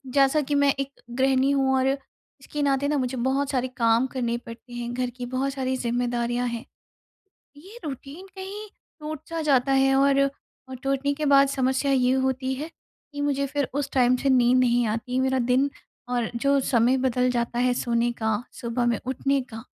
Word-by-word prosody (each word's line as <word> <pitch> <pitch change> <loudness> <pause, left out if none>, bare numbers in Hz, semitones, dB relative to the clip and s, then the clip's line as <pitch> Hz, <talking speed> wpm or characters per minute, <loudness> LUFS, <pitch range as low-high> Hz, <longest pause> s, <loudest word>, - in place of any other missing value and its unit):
जैसा 275 +3 +3
कि 290 0 -2
मैं 285 -1 +4
एक 275 0 -2 0.3
गृहिणी 265 0 +3
हूँ 270 -1 +2
और 260 - +2 0.5
इसके 295 +2 -5
नाते 280 0 +1
ना 300 - +1
मुझे 255 0 -2
बहुत 275 +1 0
सारे 255 -2 0
काम 230 +1 +3
करने 240 -3 -1
पड़ते 235 +1 -12
हैं, 240 0 -4
घर 250 0 -1
की 245 -1 -5
बहुत 275 +1 0
सारी 260 -1 -2
जिम्मेदारियाँ 240 0 -1
हैं। 235 0 -5 0.9
ये 385 +10 -13
रूटीन 285 +5 -7
कहीं 400 +3 -7 0.3
टूट-सा 310 +2 -5
जाता 275 -3 +2
है 270 0 +4
और, 275 0 +4 0.5
और 260 - -6
टूटने 275 +1 0
के 300 +1 -3
बाद 275 -1 +6
समस्या 265 +1 0
ये 255 -1 +3 0.2
होती 260 0 -1
है 300 +5 -5 0.4
कि 285 - -4
मुझे 280 -1 0
फिर 280 -1 -2
उस 280 0 -2
टाइम 255 -1 +4
से 275 +2 0
नींद 250 -1 +4
नहीं 245 -1 +3
आती। 245 +4 -2
मेरा 265 0 +1
दिन 255 +3 +2 0.4
और 245 -2 0
जो 275 +3 +2
समय 245 +1 +3
बदल 250 -1 +1
जाता 240 0 -1
है 250 0 +3
सोने 240 -1 0
का, 220 -1 -1
सुबह 240 +1 -2
में 235 -2 +1
उठने 275 +2 0
का। 225 0 -8
260 Hz, 185 wpm, -25 LUFS, 245-275 Hz, 0.9 s, बाद